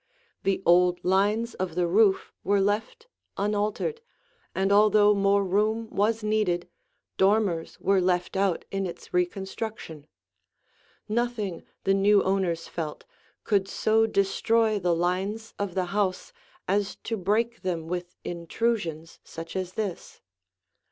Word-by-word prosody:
The 195 0 0
old 175 +1 +4
lines 205 +5 +2
of 180 -3 -4
the 180 -1 +2
roof 195 +3 +3
were 200 0 +2
left 215 - -1 0.3
unaltered, 210 - -1 0.5
and 195 +1 +1
although 210 0 +5
more 200 0 +3
room 215 +4 0
was 215 +2 +1
needed, 210 -5 0 0.5
dormers 190 -4 +1
were 195 -1 +2
left 180 0 0
out 195 -3 0
in 195 -1 -1
its 170 - -10
reconstruction. 180 -3 -3 1.0
Nothing, 220 -5 -2 0.2
the 195 - +3
new 200 +1 +4
owners 185 -4 0
felt, 155 -3 -5 0.4
could 200 -3 +1
so 220 +2 +2
destroy 215 +2 +2
the 175 -2 +1
lines 190 +6 -2
of 200 -3 -3
the 185 -1 +1
house 195 -3 -1 0.3
as 200 +1 0
to 225 - -2
break 220 +4 0
them 170 -3 -3
with 175 +1 -4
intrusions 170 -2 -3
such 165 +2 -9
as 185 -1 -3
this. 205 -5 -5
195 Hz, 125 wpm, -26 LUFS, 180-215 Hz, 1.0 s, although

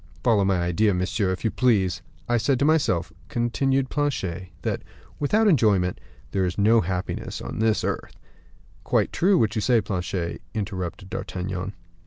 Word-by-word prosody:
"Follow 110 -5 +4
my 95 -2 +2
idea, 90 +4 +2
monsieur, 95 +2 0
if 95 - -4
you 110 - +2
please. 95 -8 +2 0.3
I 120 - +2
said 120 +4 +2
to 140 - +1
myself," 95 - +2 0.2
continued 130 +3 0
Planchet, 95 - -2
"that, - - -1 0.4
without 210 +10 +3
enjoyment, 105 - +3 0.3
there 95 - +1
is 90 0 -1
no 110 +3 +5
happiness 90 +1 -3
on - - -6
this 110 -1 +2
earth." - - -3 0.7
"Quite - - +1
true, 190 +2 +4
what 110 -7 +2
you 110 - -1
say, 120 +1 +4
Planchet," 90 -3 -3
interrupted 95 -3 -4
D'Artagnan. 95 +1 -4
100 Hz, 155 wpm, -25 LUFS, 90-120 Hz, 0.7 s, no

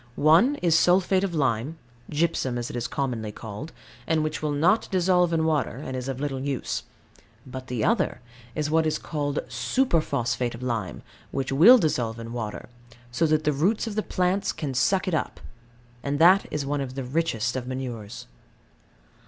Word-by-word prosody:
One 170 - +5
is 170 -2 +4
sulphate 185 +3 +4
of 185 -4 -2
lime 135 +1 0 0.3
(gypsum, 145 -5 0
as 120 -1 -4
it - - -8
is 120 -1 -2
commonly 120 -6 -3
called), 110 +9 -8 0.4
and 160 -1 +2
which 155 0 -3
will 155 - -1
not 165 +9 +2
dissolve 180 -2 +2
in 160 -1 +1
water, 150 -6 0
and 130 -2 -6
is 130 0 -4
of 135 -1 -4
little 140 -2 -2
use. 135 -1 -2 0.6
But 130 0 -8
the 125 -3 -2
other 215 -5 +1 0.4
is 150 0 -1
what 160 0 +3
is 155 - 0
called 145 -2 -3
superphosphate 130 - 0
of 120 - -9
lime, 115 -7 -3 0.3
which 135 -1 -3
will 185 - +8
dissolve 125 - 0
in 115 0 -7
water; 110 -3 -5 0.4
so 160 +7 +1
that 155 0 +2
the 150 - +2
roots 185 +12 +1
of 225 - -4
the 215 - 0
plants 185 0 0
can 150 -4 -4
suck 185 +10 +1
it 185 - -1
up: 155 - -2 0.6
and 140 +2 -2
that 180 +5 +6
is 150 -2 -3
one 145 0 -1
of 130 -1 -5
the 135 - -3
richest 125 -4 -1
of 125 -1 -4
manures. 125 -5 -6
145 Hz, 180 wpm, -25 LUFS, 125-170 Hz, 0.6 s, will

